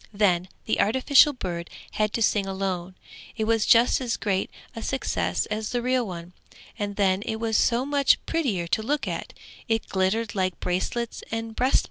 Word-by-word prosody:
Then 190 -4 +2 0.2
the - - 0
artificial 260 +6 +5
bird 175 -10 -5 0.2
had 215 -1 0
to 230 - +1
sing 205 -2 +2
alone. 190 -2 -3 0.4
It 220 - 0
was 225 -1 +1
just 235 +3 +5
as 240 -3 -1
great 195 -3 -1 0.3
a 225 - -5
success 265 +3 -1
as 215 0 -2
the 245 - -1
real 250 -2 +1
one, 175 -1 -8 0.5
and 205 -1 -3
then 195 -1 +2
it 220 - -3
was 225 0 -2
so 240 +3 +3
much 285 -1 +3
prettier 250 - -1
to 170 - 0
look 285 +6 -1
at; - - -4 0.4
it 225 -1 0
glittered 200 +4 0
like 185 -3 -1
bracelets 225 +6 -2
and 225 0 -4
breast 255 +4 +1
pins. - - +7
220 Hz, 180 wpm, -25 LUFS, 190-240 Hz, 0.5 s, pins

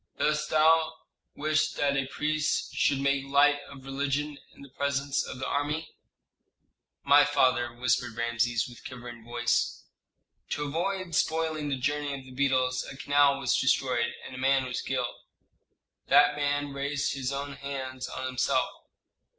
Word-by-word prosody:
"Dost 150 0 0
thou 160 +1 +4 0.4
wish 155 +1 +1
that 140 -1 +1
a 135 -1 0
priest 155 +2 -1
should 140 - +2
make 140 0 +1
light 145 +1 +4
of 135 -1 -12
religion 140 +2 -2
in - - -15
the 140 - -12
presence 140 0 -1
of - - -7
the 130 - -4
army?" 150 +3 -1 1.1
"My 145 +1 +7
father," 130 -4 +2
whispered 120 -1 0
Rameses, 115 0 0
with 120 -1 -13
quivering 120 -2 -9
voice, 120 0 0 0.7
"to 145 - -2
avoid 175 +4 -2
spoiling 160 -2 0
the 135 - -1
journey 145 +2 -1
of 135 - -12
the 130 - -13
beetles 130 -1 +1
a 135 - -10
canal 145 0 +3
was - - +1
destroyed, 125 -2 +1
and - - -9
a 130 - -7
man 135 0 +3
was 125 -1 -3
killed." - - -3 0.9
"That 145 +1 +6
man 145 -1 -1
raised 140 +1 -1
his 135 -1 -3
own 140 +1 -4
hands 130 -2 -5
on 130 - -5
himself." 130 0 +1
140 Hz, 150 wpm, -28 LUFS, 130-145 Hz, 1.1 s, My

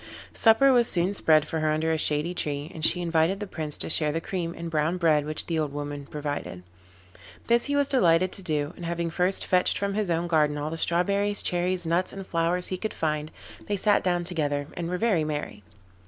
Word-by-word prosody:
Supper 245 +4 +5
was 240 -2 +4
soon 180 +3 +1
spread 155 -5 +3
for 160 - -3
her 155 0 0
under 155 +1 0
a 160 - +1
shady 150 +3 0
tree, 145 -3 -3
and 160 - -8
she 175 +2 +3
invited 165 +3 +1
the 210 - -4
Prince 155 -6 -5
to - - 0
share 155 -1 +1
the 165 - -2
cream 170 -1 -4
and 170 - -5
brown 160 +2 0
bread 155 -4 +2
which 155 0 -1
the 165 -2 -1
old 150 -2 -2
woman 145 -1 -6
provided. 145 -12 -5 0.8
This 235 0 +3
he 285 - -1
was 285 -1 +3
delighted 185 -9 +3
to 195 - -6
do, 155 -3 -2
and - - -10
having 170 0 -2
first 180 +3 0
fetched 180 -1 +2
from 200 0 -2
his 210 -2 -1
own 170 0 0
garden 155 -3 +1
all 150 +1 -3
the - - -3
strawberries, 200 +5 +1
cherries, 180 0 0
nuts 170 +3 0
and 195 -1 -7
flowers 175 +1 0
he 185 - -4
could 220 - -4
find. 155 -1 -2 0.4
they 205 - 0
sat 205 +2 +2
down 175 -1 0
together 145 -5 -2
and 170 -1 -4
were 180 - -2
very 200 -6 +1
merry. 150 -8 -4
170 Hz, 220 wpm, -26 LUFS, 155-185 Hz, 0.8 s, Supper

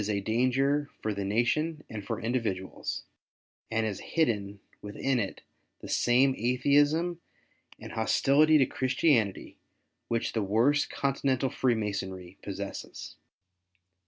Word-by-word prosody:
a 100 -1 +1
danger 130 +7 +1
for 110 - -2
the 100 0 -3
nation 150 +10 0
and 105 -2 -7
for 115 +1 -3
individuals, 110 -6 -3 0.7
and 115 0 0
has 105 -3 -3
hidden 105 -10 -1 0.2
within 125 +5 -1
it 100 -4 -4 0.4
the - - -8
same 130 +3 +3
Atheism 145 +8 +2 0.6
and - - -9
hostility 145 +7 +4
to 135 - +5
Christianity 130 - +1 0.5
which 115 0 -1
the 110 - 0
worst 115 +9 +2
Continental 135 -1 0
Freemasonry 100 -6 -2
possesses. 100 0 -7
120 Hz, 110 wpm, -29 LUFS, 105-140 Hz, 0.7 s, to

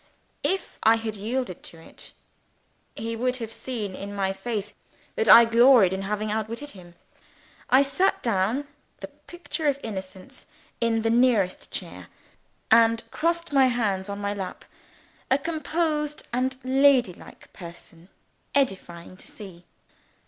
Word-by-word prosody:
If 380 0 -2
I 225 +1 +5
had 225 -1 -4
yielded 220 -1 -3
to 165 - -11
it, 165 - -13 0.8
he 230 +1 -4
would 250 +2 -1
have 225 -3 -6
seen 225 -3 -5
in 200 +2 -7
my 195 -1 0
face 210 0 -4 0.4
that 455 -2 0
I 235 0 +10
gloried 230 -4 +5
in 190 - -3
having 210 +2 -2
outwitted 230 +7 -4
him. 175 -3 -15 0.7
I 265 +2 +6
sat 370 +8 0
down, 230 +6 0 0.3
the - - -7
picture 345 -3 -6
of 280 -1 +1
innocence, 190 -3 -8 0.3
in 225 -1 +1
the 225 - +1
nearest 230 -6 +2
chair, - - -7 0.6
and 230 0 +5
crossed 335 -1 -1
my 270 -2 +5
hands 205 -6 -1
on 200 - -4
my 205 0 -2
lap, 190 -3 -7 0.6
a 265 - +4
composed 310 -1 -2
and 260 +2 0
ladylike 260 -6 +1
person, 170 0 -12 0.5
edifying 185 -10 -2
to - - -11
see. 185 -5 -11
230 Hz, 135 wpm, -25 LUFS, 195-265 Hz, 0.8 s, I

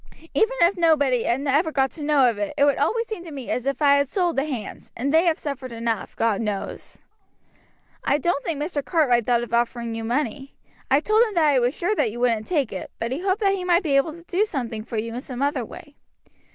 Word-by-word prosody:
Even 450 +3 +2
if 345 +3 +5
nobody 285 -8 +3
ever 280 +6 +1
got 270 -3 +1
to 320 - -11
know 290 -3 +4
of 225 -4 -1
it, 205 - -3
it 285 - +5
would 285 - +2
always 460 0 +1
seem 430 -6 -6
to 340 - -9
me 275 -5 -6
as 250 +1 -2
if 275 +2 -1
I 280 -1 +6
had 280 0 +1
sold 350 +2 0
the 270 - +1
hands, 255 -8 -6
and 275 +5 -1
they 325 +2 +5
have 330 -2 +2
suffered 275 -3 -5
enough, 230 -2 -3
God 225 -2 +1
knows." 210 -3 -5 1.1
"I 280 - +2
don't 295 -2 -1
think 320 -4 -3
Mr. 295 -1 -2
Cartwright 260 - +2
thought 240 -1 +2
of 235 - -8
offering 235 0 0
you 225 0 -4
money. 270 +3 -2 0.3
I 275 +2 +4
told 430 +6 +3
him 440 -4 +1
that 315 -3 +4
I 275 -3 +4
was 245 +4 +1
sure 360 +5 0
that 290 - 0
you 240 - -7
wouldn't 230 -3 +1
take 290 -9 0
it, 185 - -6
but 230 +1 -3
he 265 - -2
hoped 380 +3 0
that 395 -1 +3
he 380 -2 -3
might 355 +1 +3
be 290 -5 +1
able 275 +3 +2
to 335 +1 -13
do 365 +4 +1
something 240 - -4
for 235 0 -6
you 230 +1 -3
in 245 - -4
some 260 0 -5
other 280 -3 0
way." 290 +6 -11
280 Hz, 245 wpm, -23 LUFS, 240-330 Hz, 1.1 s, I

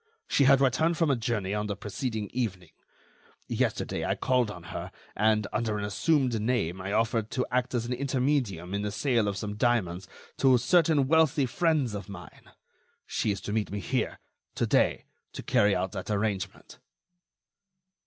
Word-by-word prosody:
She 140 - +3
had 135 0 +6
returned 160 +5 +2
from 165 -4 +2
a - - +3
journey 110 -5 -2
on 105 0 -1
the 100 - -2
preceding 110 +1 -4
evening. 95 -9 -3 0.8
Yesterday, - - -1
I - - 0
called 125 -3 +1
on 90 -4 -8
her - - -5 0.2
and, 110 0 +2
under 110 -1 -1
an 105 - -3
assumed 125 +1 +1
name, 105 -6 -1
I 100 +1 -4
offered 115 0 +1
to 125 - -1
act 125 0 0
as 120 -1 0
an 125 - -2
intermedium 125 - -1
in 100 - -1
the 105 - -2
sale 120 -2 +1
of 100 -1 -2
some 105 0 -4
diamonds 95 -7 0 0.3
to 130 -2 +5
certain 155 -1 +3
wealthy 155 -2 +3
friends 150 - +1
of 105 0 -6
mine. 90 -3 -11 0.6
She - - -1
is 100 -1 -1
to 105 - -4
meet 110 -1 0
me 100 - -3
here 90 - -2 0.4
to - - +1
day - - +2 0.3
to - - -7
carry 105 -1 +3
out 90 0 -1
that - - -6
arrangement." 100 -2 -3
110 Hz, 175 wpm, -28 LUFS, 100-130 Hz, 0.8 s, had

